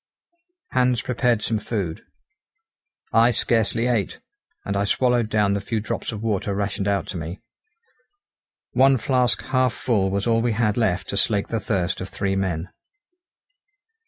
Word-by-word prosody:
Hans 125 -2 +2
prepared 120 -3 +1
some 110 -2 0
food. 100 -6 -3 1.1
I 115 +1 +6
scarcely 115 0 +1
ate, 120 -5 0 0.5
and 100 - -2
I 100 - +1
swallowed 120 +2 +2
down 105 -2 +2
the 100 - -1
few 110 +2 -2
drops 110 +3 -4
of 110 -1 -6
water 100 -2 -1
rationed 100 0 -2
out 100 -1 +1
to 95 - -4
me. 85 +4 -6 1.3
One 135 +1 +5
flask 125 0 +1
half 130 -2 +1
full 100 -6 0
was 100 +1 -1
all 115 -1 +2
we 120 -1 +1
had 105 -2 +1
left 105 -6 0
to 100 - -2
slake 100 0 +1
the 115 - -1
thirst 95 -4 -1
of 95 - -5
three 95 -1 -1
men. 90 -3 -2
105 Hz, 155 wpm, -23 LUFS, 100-120 Hz, 1.3 s, I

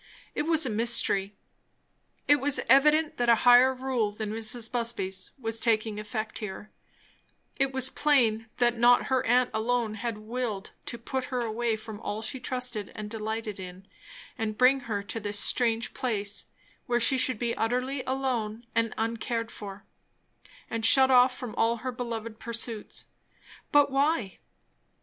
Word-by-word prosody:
It 300 - -2
was 320 -4 +2
mysterious. 220 -3 +1 1.0
It 290 - +6
was 285 0 0
evident 300 +4 +4
that 240 -1 +1
a 235 - +7
higher 245 +2 +7
rule 255 -5 -1
than 210 0 -5
Mrs. 225 +1 -2
Busby's 230 -6 -1
was 225 -3 -3
taking 220 -2 +1
effect 215 +1 -5
here; 210 0 -7 0.9
it 270 0 +1
was 265 0 +1
plain 225 -7 +2
that 240 -1 +2
not 245 +1 +5
her 260 0 +2
aunt 250 +1 +3
alone 225 0 0
had 225 0 -4
willed 215 -2 -4 0.2
to 235 - -3
put 260 +3 -4
her 255 -2 -2
away 230 0 -1
from 215 -1 -9
all 215 0 -4
she 255 +4 -1
trusted 250 -5 -4
and 210 0 -7
delighted 220 -2 -4
in, 185 +1 -9 0.5
and 215 -1 -2
bring 260 +2 +5
her 205 -2 -2
to 225 +2 -4
this 205 -1 0
strange 230 0 +1
place; 205 -5 -1 0.4
where 240 -1 +2
she 260 +2 +4
would 250 - -6
be 235 +1 -2
utterly 255 +4 -1
alone 245 -4 -2
and 230 -1 0
uncared 230 +1 -2
for 200 -1 -9 0.8
and 230 -1 -4
shut 265 +3 +5
off 250 0 +5
from 245 -4 -6
all 230 +1 +2
her 255 +3 -4
beloved 230 -2 -5
pursuits. 230 -1 -4 0.7
But 290 -2 +5
why? 275 - 0
230 Hz, 155 wpm, -28 LUFS, 215-255 Hz, 1.0 s, a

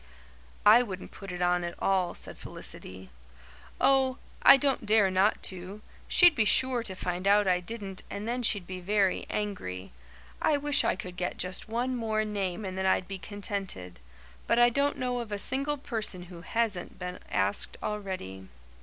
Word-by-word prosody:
"I 220 +4 +8
wouldn't 190 -6 -6
put 195 -2 -9
it 180 0 -3
on 175 0 +2
at 170 0 -4
all," 185 -3 +1
said - - -7
Felicity. 95 0 -9 0.7
"Oh, 265 -1 +3 0.2
I 275 - +9
don't 270 -5 0
dare 210 -3 +4
not 190 +3 +2
to. 185 +3 -3 0.3
She'd 350 -2 +7
be 225 - +2
sure 250 +3 +3
to 195 -5 -6
find 180 +1 -3
out 205 0 +5
I 180 -1 +3
didn't 195 0 -5
and 205 +2 -5
then 245 +2 -1
she'd 205 -5 +1
be 185 0 -6
very 195 +1 +1
angry. 95 - -4 0.5
I 300 - +3
wish 285 -1 +3
I - - +1
could 180 -1 -8
get 180 0 -3
just 185 +3 -3
one 245 +3 -1
more 220 -2 -1
name 200 -2 -3
and 185 -1 -5
then 190 - +1
I'd 185 -1 +2
be 195 -1 -6
contented. 195 - -5 0.5
But 230 - +3
I 240 0 +6
don't 280 +3 +1
know 250 -1 -1
of 230 -3 -6
a 205 - -1
single 275 +7 -1
person 220 -9 -4
who 170 - -10
hasn't 215 -2 -2
been 180 0 -6
asked 100 +1 +1
already." 185 - -5
200 Hz, 180 wpm, -29 LUFS, 180-235 Hz, 0.7 s, I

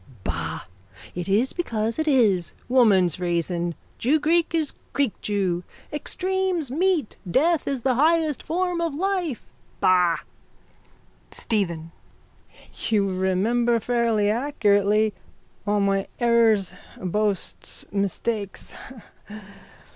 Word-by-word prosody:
_ - - -18
Bah! 80 -2 -3 0.5
It 180 +1 -4
is 220 +7 +2
because 230 -8 -2
it 315 - 0
is. 215 - +3
Woman's 200 - +4
reason. 175 -1 -1 0.2
Jewgreek 310 +6 +2
is 315 -3 0 0.2
greekjew. 205 -9 0 0.3
Extremes 365 -1 -1
meet. 335 - +1
Death 315 - +2
is 270 -4 -2
the 265 - +3
highest 310 +2 +2
form 355 +1 -1
of 330 -4 -1
life. 360 - -1 0.3
Bah! 180 -2 +4 1.1
STEPHEN: 170 -7 -2 1.0
You 205 -3 +3
remember 210 +6 +1
fairly 230 -2 +1
accurately 215 -4 +2 0.5
all 205 0 +2
my 195 -1 +1
errors, 230 -6 +3 0.3
boasts, 200 +1 -2
mistakes. 200 +1 -2
225 Hz, 95 wpm, -24 LUFS, 190-290 Hz, 1.1 s, Woman's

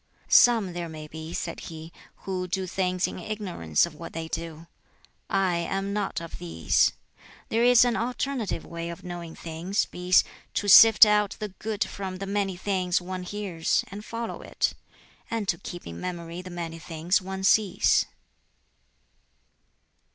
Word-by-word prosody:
"Some 225 -7 +5
there 170 -1 -4
may 155 -1 -8
be," 160 +1 -8
said 170 -1 -4
he, 160 0 -9 0.3
"who 185 -1 -2
do 190 +1 -2
things 185 0 0
in - - -5
ignorance 180 - 0
of 170 - -9
what 165 +2 -9
they 165 0 -4
do. 165 0 -6 0.6
I 190 -3 +2
am 195 +3 -2
not 205 -4 -1
of 170 0 -8
these. 80 -2 +2 0.6
There 230 +1 +2
is 245 0 +7
an 245 - +1
alternative 245 -4 -2
way 170 0 -5
of 170 - -8
knowing 175 -2 -7
things, 170 +5 -2
viz. 180 +1 +3 0.3
to 205 - -1
sift 225 +3 +10
out 210 -1 +2
the 210 -1 -4
good 210 +2 -3
from 190 -2 -6
the 195 - -5
many 195 -2 -1
things 185 -2 0
one 185 +1 -5
hears, 180 -3 -1
and 205 +2 -8
follow 230 +1 -5
it; - - -1 0.6
and 225 -3 -2
to - - +1
keep 175 -2 -8
in 85 0 -8
memory 170 -1 -5
the 185 - -9
many 170 -2 -6
things 165 +4 0
one 190 +1 -5
sees." 200 -1 +3
185 Hz, 160 wpm, -26 LUFS, 170-205 Hz, 0.6 s, sift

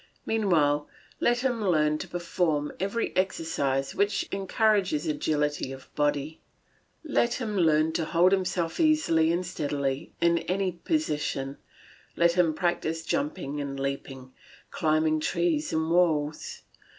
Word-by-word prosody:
Meanwhile, 155 -10 +2 0.3
let 240 +1 +2
him 245 -4 0
learn 155 -5 +2
to - - -5
perform 170 -4 -1
every 200 +5 -2
exercise 140 -7 0
which 200 +1 0
encourages 195 -4 +1
agility 150 -2 -1
of 135 -1 -11
body; 145 +1 -1 0.6
let 245 -6 +1
him 220 -5 -3
learn 160 -3 +3
to 160 0 -1
hold 170 +3 +3
himself 180 -3 0
easily 305 - +3
and 175 +2 -1
steadily 145 -3 -2
in 170 0 +3
any 185 +1 -1
position, 150 - -2 0.6
let 170 0 +5
him 170 -3 +2
practise 165 -1 -1
jumping 275 - -2
and 140 -1 -5
leaping, 135 -1 -5 0.4
climbing 155 -2 +1
trees 310 - 0
and 160 +1 0
walls. 155 -4 +1
165 Hz, 125 wpm, -27 LUFS, 150-195 Hz, 0.6 s, let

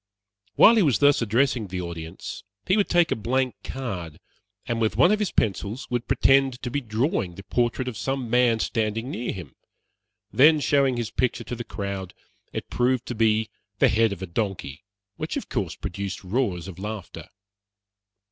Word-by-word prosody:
While 230 +2 +7
he - - +5
was 145 - +3
thus 145 -2 +4
addressing 115 -1 +1
his 90 0 -4
audience, 85 -2 -6 0.2
he 185 - +3
would 205 -2 +1
take 175 -2 +3
a - - +2
blank 130 +3 0
card, 95 - -5 0.5
and 115 -1 -1
with 110 - +1
one 175 - +6
of 210 - +2
his 210 -4 -1
pencils 105 +2 -1
would 120 -1 -1
pretend 135 -2 +3
to 125 - -3
be 145 - -1
drawing 110 - -1
the 95 - -10
portrait 120 +3 0
of 125 - -4
some 135 +3 -2
man 120 -1 +3
standing 115 +3 -1
near 120 -2 -3
him; 90 -4 -8 0.8
then 155 +4 +6
showing 140 -3 +2
his 120 -1 -3
picture 130 -2 0
to 120 - -5
the 120 - -5
crowd, 100 -4 -5 0.4
it - - -5
proved 125 0 +1
to - - -2
be 110 -1 +2 0.3
the - - +5
head 115 0 +3
of 95 -1 -5
a - - -1
donkey, 90 -6 -4 0.3
which, - - -3
of - - -6
course, - - -2
produced 100 +2 -5
roars 95 -4 -1
of 95 -1 -9
laughter. 95 -5 -7
115 Hz, 180 wpm, -25 LUFS, 100-130 Hz, 0.8 s, While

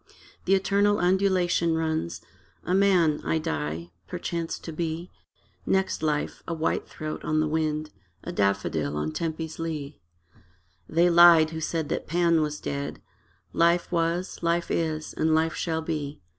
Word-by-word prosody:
The 195 - +4
eternal 200 +1 +2
undulation 180 -3 +2
runs: 155 - -2 0.4
A 180 - -1
man, 185 -6 +3
I 160 - 0
die: 80 - -3 0.2
perchance 170 - -3
to 165 - -8
be, 165 +2 -4 0.5
Next 190 -4 0
life, 150 -2 -1
a 170 - -2
white 160 0 -1
throat 155 0 -6
on 155 0 +1
the 155 - +2
wind, 155 0 -1 0.3
A - - -5
daffodil 90 -7 0
on 75 +1 -2
Tempe's 160 - -4
lea. 155 -3 -4 0.9
They 170 +2 +3
lied 170 -2 +7
who 160 0 -5
said 160 -1 -2
that - - -3
Pan 170 0 +3
was 150 0 -2
dead: 140 0 -4 0.5
Life 170 +1 +2
was, 170 +2 -1
life 170 0 0
is, 155 -2 -1
and 160 0 +2
life 160 0 +2
shall 160 -1 -2
be. 150 -3 -4
160 Hz, 145 wpm, -26 LUFS, 155-170 Hz, 0.9 s, lied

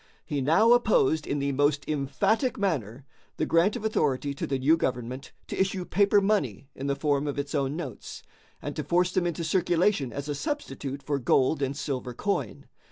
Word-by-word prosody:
He 145 -4 -2
now 190 - +4
opposed 160 - +3
in 145 - -1
the 140 0 0
most 145 +1 +1
emphatic 155 - 0
manner 140 - -2 0.3
the - - 0
grant 170 +5 +3
of 215 - -5
authority 145 -9 0
to 140 - -4
the 135 - 0
new 140 +5 +4
government 130 -3 -3
to - - -6
issue 190 -1 0
paper 200 +2 +3
money 170 - 0
in 135 - -5
the 140 - +1
form 145 0 0
of 145 - -3
its 140 0 -3
own 140 -1 0
notes, 145 -10 -7 0.4
and - - -4
to - - -3
force 180 +1 +2
them 180 -1 +1
into 170 0 -3
circulation 175 - +1
as 140 +3 -5
a 145 - -1
substitute 145 - -4
for 145 -1 -1
gold 130 +4 +2
and 135 +1 -1
silver 130 -4 -4
coin. 200 +8 -2
145 Hz, 190 wpm, -27 LUFS, 135-180 Hz, 0.4 s, now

